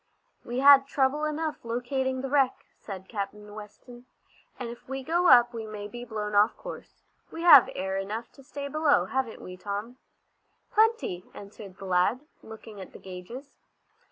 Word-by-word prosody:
"We 245 +2 -3
had 280 -1 +8
trouble 280 +2 +1
enough 305 0 -3
locating 255 +2 -2
the 270 - -4
wreck," 275 -3 +1
said 190 -2 -8
Captain 210 0 -6
Weston, 240 +4 -12 0.5
"and 245 -2 -5
if 235 +2 -12
we 270 0 -4
go 345 +5 +1
up 240 -3 +7
we 225 -1 -6
may 210 -1 -7
be 240 +3 -8
blown 210 -2 -4
off 205 +2 +4
our - - -35
course. - - -10 0.3
We 330 - -7
have 295 -7 +9
air 190 +1 -2
enough 210 +4 -5
to 275 - -17
stay 280 +1 -6
below, 305 +1 +2
haven't 260 -4 -3
we, 180 0 -9
Tom?" 205 +6 -5 0.7
"Plenty," 435 - +1
answered 200 -1 -11
the 195 - -9
lad, 185 +7 +2 0.2
looking 220 -2 -11
at 185 - -11
the - - -11
gages. 195 +10 -10
240 Hz, 170 wpm, -27 LUFS, 205-275 Hz, 0.7 s, have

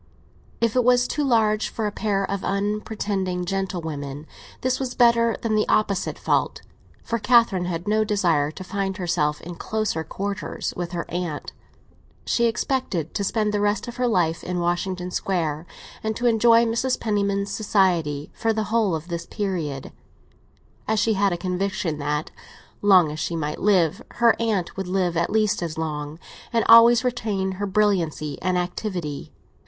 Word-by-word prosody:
If 230 -1 +1
it 250 - +4
was 250 +1 +4
too 295 - -1
large 220 -5 +2
for 220 - -3
a 210 - -1
pair 200 -2 -1
of 200 0 -4
unpretending 200 -2 -2
gentlewomen, 160 -7 -4 0.4
this 255 0 0
was 255 -2 -3
better 235 -1 +4
than 225 -2 0
the 215 0 +2
opposite 200 -3 +1
fault; - - 0 0.4
for 230 - -2
Catherine 230 -6 +4
had 175 +1 -4
no 215 +1 +3
desire 175 -9 +1
to 170 +5 -8
find 195 0 -3
herself 150 -5 0
in 175 - -7
closer 210 -3 -2
quarters 200 +5 -4
with 175 0 -4
her 170 - -3
aunt. 175 -4 -4 0.7
She 235 - +2
expected 225 - -2
to 200 - -1
spend 210 +1 0
the 205 - +1
rest 205 +2 0
of 240 +1 -7
her 250 0 +1
life 170 -7 +1
in 180 0 -2
Washington 180 +1 -2
Square, 165 -4 -2 0.3
and 220 0 -2
to 245 - -3
enjoy 230 0 +5
Mrs. 235 +3 0
Penniman's 200 -2 0
society 175 -9 +1
for 225 -1 0
the 215 -1 -3
whole 215 -7 +2
of 160 +2 -6
this 170 -1 -5
period; 170 -10 -3 1.0
as 220 - +1
she 220 +2 +2
had 200 -1 +2
a 175 - -1
conviction 180 -3 -2
that, 150 +1 -2 0.5
long 185 -6 +5
as 155 - -6
she 165 +2 -2
might 150 -2 -3
live, 185 -6 +3
her 235 -1 +4
aunt 210 -7 -1
would 190 -1 -4
live 180 -2 0
at 170 +1 +1
least 215 -3 +1
as 165 -2 -4
long, 150 -1 -4 0.3
and 230 -2 +1
always 230 +1 +8
retain 215 -6 -1
her 200 +2 -3
brilliancy 185 -8 0
and 185 +1 +1
activity. 175 -4 -4
195 Hz, 165 wpm, -23 LUFS, 170-220 Hz, 1.0 s, always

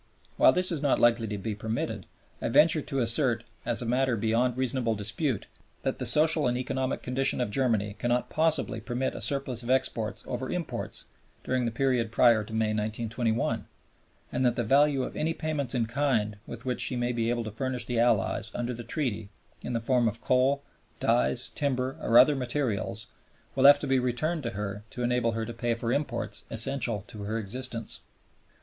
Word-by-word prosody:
While - - +6
this 180 0 +3
is 160 -5 -2
not 145 -3 +2
likely 115 -1 +3
to 105 0 -4
be 105 +2 -4
permitted, 110 +2 -4 0.3
I - - -1
venture 155 +5 +5
to 140 -1 -4
assert 120 0 +2 0.2
as 120 0 0
a - - -5
matter 125 0 +1
beyond 115 +3 +1
reasonable 130 -3 0
dispute 110 - -1 0.4
that - - -2
the - - +2
social 155 -2 +4
and 125 0 0
economic 130 +1 -2
condition 130 +2 0
of 120 -4 -1
Germany 105 -5 0
cannot 120 +1 0
possibly 155 -8 +1
permit 120 +3 -2
a - - -6
surplus 135 -4 +1
of 120 - -7
exports 130 -4 0
over 125 +1 -4
imports 180 -3 -3 0.4
during 130 -1 0
the 115 - -1
period 120 -2 0
prior 115 -2 +4
to 110 - -12
May, 110 -1 0
1921, 110 +2 -2 0.6
and - - -1
that 120 -2 +2
the 120 - -1
value 140 +3 +3
of - - -6
any 165 +1 -1
payments 145 -5 -2
in 120 -2 +1
kind 115 -4 0
with 120 +2 -8
which 125 -1 +1
she 130 - +2
may 120 0 0
be 115 -1 -1
able 120 -1 -1
to 110 - -6
furnish 130 +2 -3
the 120 -2 -1
Allies 115 -2 +1
under 120 +1 -2
the 120 0 -7
Treaty 115 -5 -3 0.3
in 125 - -5
the 115 - 0
form 120 0 +2
of 115 +1 -2
coal, 135 +2 +2 0.4
dyes, 65 +2 +1
timber, 130 -2 -1
or 115 - +3
other 135 +4 +7
materials 120 -4 -2 0.5
will 135 0 +2
have 145 +1 +10
to - - -5
be 135 -1 +2
returned 150 +7 -1
to 120 - -3
her 105 0 -4
to 125 - -5
enable 120 -1 +1
her 115 0 -2
to 120 - -6
pay 115 0 -1
for 115 +1 -2
imports 145 +1 -2
essential 115 -7 +1
to 105 -3 -9
her 105 +2 -3
existence. 115 +1 -4
120 Hz, 195 wpm, -28 LUFS, 115-130 Hz, 0.6 s, have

